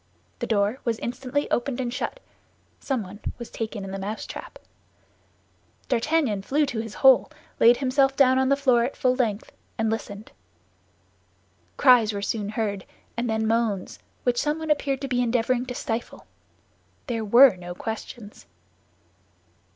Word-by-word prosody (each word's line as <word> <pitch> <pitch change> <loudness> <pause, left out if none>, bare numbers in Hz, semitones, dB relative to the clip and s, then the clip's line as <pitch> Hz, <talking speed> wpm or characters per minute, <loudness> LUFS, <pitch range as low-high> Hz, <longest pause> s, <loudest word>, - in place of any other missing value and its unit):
The - - -3
door 210 +3 +1
was 235 -3 -1
instantly 255 +4 -3
opened 245 +1 -1
and 245 -2 -2
shut; 285 - -4 0.6
someone 210 -7 -4 0.2
was 235 - -9
taken 220 -2 -5
in 195 - -6
the 195 - -5
mousetrap. 205 +3 -6 1.3
D'Artagnan 255 -4 +1
flew 290 +9 +1
to 240 -5 -4
his 220 -1 -6
hole, 265 -2 +7 0.3
laid 240 +1 +6
himself 270 0 +2
down 260 -1 +4
on 265 0 +2
the 275 - +4
floor 255 -4 +3
at 255 - -3
full 255 -1 +2
length, 225 -5 -1 0.3
and 225 0 0
listened. 210 -1 -6 1.5
Cries 245 -5 +5
were 200 - -3
soon 205 -1 -2
heard, 210 -3 -3 0.3
and 235 +1 -2
then 220 0 0
moans, 220 -4 -1 0.2
which 245 -1 +1
someone 310 +1 -1
appeared 280 -2 0
to 275 - -3
be 250 -1 0
endeavoring 245 +1 0
to 250 - -5
stifle. 230 0 -4 0.8
There 230 -4 -2
were 235 +2 +7
no 175 -1 -8
questions. 220 0 -7
235 Hz, 145 wpm, -25 LUFS, 220-260 Hz, 1.5 s, hole